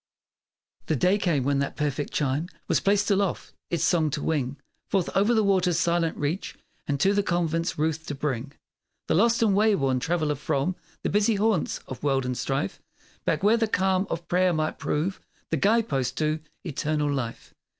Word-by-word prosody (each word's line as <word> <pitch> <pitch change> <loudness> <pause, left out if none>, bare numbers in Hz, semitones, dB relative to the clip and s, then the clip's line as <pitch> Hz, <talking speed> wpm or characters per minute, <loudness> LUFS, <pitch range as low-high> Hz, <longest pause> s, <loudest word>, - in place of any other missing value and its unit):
The 155 - +1
day 185 +8 +3
came 160 -9 +1
when 140 +1 +1
that 140 - -2
perfect 145 -1 -2
chime 145 +3 0 0.2
Was - - +2
placed 205 +1 +2
aloft, 200 -2 0 0.2
its 170 - -1
song 160 -4 +3
to 145 - -3
wing 140 -4 -1 0.3
Forth 190 -3 0
o'er 195 - +4
the 220 - +3
waters' 185 -4 +2
silent 170 -1 +1
reach 150 +6 -2 0.3
And 140 -1 -1
to 195 +6 +4
the 205 - +3
convent's 170 -2 -1
roof 160 +1 0
to 145 - -3
bring 135 -1 -3 0.5
The - - +2
lost 230 +7 +3
and 205 -3 +3
wayworn 195 -12 +3
traveller 160 0 0
from 145 +5 -1 0.3
The - - 0
busy 210 +2 +3
haunts 205 -4 0
of 130 - -7
world 135 -3 +1
and 125 0 -2
strife, 135 -5 -2 0.4
Back, - - 0
where 215 +3 +5
the 225 -1 +1
calm 190 -1 +1
of 170 0 -4
prayer 180 0 +3
might 155 -1 -1
prove 170 +6 -1 0.3
The 165 - +2
guide 220 +7 +3
post 130 -2 -1
to 155 0 0 0.3
Eternal 150 -1 -1
life! 120 -4 -5
165 Hz, 180 wpm, -26 LUFS, 145-195 Hz, 0.5 s, where